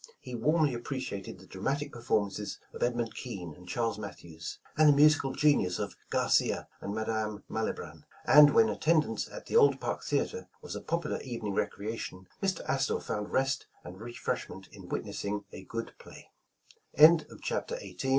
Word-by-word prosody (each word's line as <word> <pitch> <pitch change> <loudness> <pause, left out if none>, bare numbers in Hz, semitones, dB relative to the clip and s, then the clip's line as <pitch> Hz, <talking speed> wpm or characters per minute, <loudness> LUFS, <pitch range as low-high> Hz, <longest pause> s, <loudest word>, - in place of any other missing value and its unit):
He 125 - -9
warmly 150 +4 +2
appreciated 120 -6 -5
the 95 - -15
dramatic 140 +11 -2
performances 105 -4 -1 0.2
of - - -9
Edmund 120 -2 0
Kean 100 - -6
and 90 +2 -15
Charlea 115 +1 -1
Mathews, 85 -5 -7 0.2
and 155 -1 +6
the - - +7
musical 145 -2 +5
genius 130 -13 +3
of - - -4
Garcia - - +2
and 100 - -4
Ma 110 - -1
dame 110 -1 -2
Malibran; 110 0 -4 0.2
and 150 -1 +8
when 225 -1 +7
attendance 155 -1 +1
at - - -9
the - - -4
old 450 -2 +6
Park - - -3
Theatre 465 - -1
was - - -7
a - - -5
popular 170 -2 -2
evening 115 -6 -4
recreation, 100 -2 -3
Mr. 190 -3 -1
Astor 135 0 +1
found 105 0 -4
rest 135 0 +1 0.2
and 90 +3 -10
refreshment 120 -4 -4
in 95 -3 -11
witnessing 100 0 -3
a - - -8
good 115 +2 -5
115 Hz, 150 wpm, -30 LUFS, 100-145 Hz, 0.2 s, and